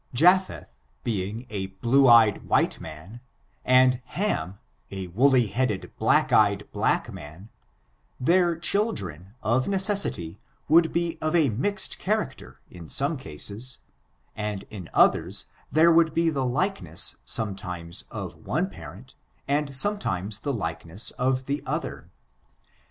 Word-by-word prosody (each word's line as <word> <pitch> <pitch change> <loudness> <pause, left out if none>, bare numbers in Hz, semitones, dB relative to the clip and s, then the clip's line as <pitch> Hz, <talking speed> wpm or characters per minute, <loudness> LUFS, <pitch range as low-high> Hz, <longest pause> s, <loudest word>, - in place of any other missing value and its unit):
Japheth 180 +7 +3 0.3
being 110 +2 -3
a 95 -2 -3
blue 120 +8 +2
eyed 115 -4 +5
white - - +2
man, 90 +10 -10 0.4
and 125 0 +4
Ham 175 - -2 0.3
a 95 -1 -5
woolly 125 +6 +4
headed, 110 -2 -2
black - - +3
eyed - - +3
black - - 0
man, 80 +9 -11 0.7
their 175 +5 +3
cAt/ 200 +7 +1
dren, 95 +1 -7
of 120 +4 +1
necessity, 190 - 0 0.3
would 160 +2 +5
be 170 -1 -2
of 155 +2 0
a 155 -5 +4
mixed 190 - -1
character 160 - -3
in 85 -3 -12
some 140 +4 0
cases, 115 - -3 0.5
and 105 -2 -4
in 95 -5 -8
others - - +2 0.3
there 165 +2 +5
would 165 -1 +3
be 165 0 +2
the 135 -4 -1
likeness 125 - -1
sometimes 90 -5 -3
of - - -6
one - - -2
parent, - - -12 0.3
and 140 0 0
sometimes 110 - 0
the 140 - -2
likeness 85 -2 -3
of 130 +1 -1
the 140 +2 -2
other. - - -4
125 Hz, 130 wpm, -25 LUFS, 95-160 Hz, 0.7 s, eyed